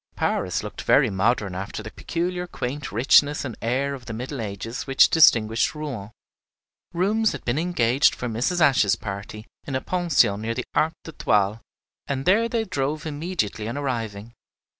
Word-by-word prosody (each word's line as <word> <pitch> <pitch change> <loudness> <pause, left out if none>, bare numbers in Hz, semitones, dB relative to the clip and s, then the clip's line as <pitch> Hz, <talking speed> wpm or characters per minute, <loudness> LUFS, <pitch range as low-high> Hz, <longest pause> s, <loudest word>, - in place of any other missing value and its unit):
Paris - - -1
looked - - -7
very - - +4
modern 100 0 +1
after 100 +3 -5
the 110 - -8
peculiar 180 +1 -3
quaint 135 - -5
richness 145 +6 +4
and 120 -5 -5
air 135 +4 0
of 130 -3 -9
the 115 - -5
Middle 125 +3 -5
Ages 110 +5 -5
which 135 0 +5
distinguish 115 -6 +4
Rouen. 135 -10 -5 0.8
Rooms 210 +6 +1
had - - -8
been 120 +5 0
engaged 140 -6 +2
for 125 - -4
Mrs. 125 +10 -1
Ashe's 130 -9 +4
party 100 +1 -7 0.2
in 135 - -3
a 130 - -1
pension 170 - +2
near 115 +1 -2
the 130 - -3
Arc 160 +1 +2
d'Étoile, 105 -9 0 0.5
and 135 -1 -3
there 225 +5 +3
they 230 -1 0
drove 150 -3 -2
immediately 145 - -3
on 120 - -4
arriving. 115 -5 -4
130 Hz, 160 wpm, -24 LUFS, 110-155 Hz, 0.8 s, which